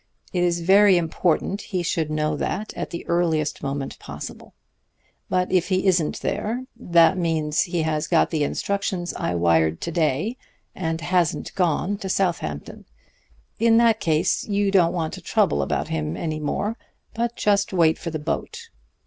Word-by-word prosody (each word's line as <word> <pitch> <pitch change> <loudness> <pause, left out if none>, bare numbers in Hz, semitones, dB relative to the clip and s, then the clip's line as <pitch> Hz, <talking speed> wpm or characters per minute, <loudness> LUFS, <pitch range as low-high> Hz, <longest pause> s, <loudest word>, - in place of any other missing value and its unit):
It 180 - +1
is 170 -1 +1
very 195 +2 +6
important 175 +3 0
he 185 -3 -3
should 160 -2 -1
know 155 0 0
that 205 +7 -3
at - - -4
the 170 - -6
earliest 160 -4 0
moment 140 0 -4
possible. - - -9 0.7
But 180 0 0
if 185 -2 +2
he 185 0 0
isn't 175 -5 +1
there, 240 +4 -2
that 175 -5 +4
means 160 -3 +1
he 175 -2 -1
has 155 -1 -1
got 170 0 +3
the 155 -3 +1
instructions 190 +2 -2
I 90 - -2
wired 80 -2 +2
to 170 - -3
day, 165 - 0 0.4
and 165 -3 -2
hasn't 175 -1 0
gone 180 +3 0
to 195 - -5
Southampton. 170 - -2 0.7
In 225 0 +5
that 230 -2 +4
case 155 -1 +1
you 200 -1 +1
don't 180 -4 +4
want 160 -3 -2
to - - -7
trouble 70 0 +1
about 75 +1 -2
him 80 0 -2
any 155 -2 -3
more, 205 +9 -2 0.3
but 235 +1 -2
just 200 -1 +1
wait 165 -4 +3
for 170 - -4
the 160 - -3
boat. 155 +2 -4
170 Hz, 165 wpm, -23 LUFS, 155-195 Hz, 0.7 s, very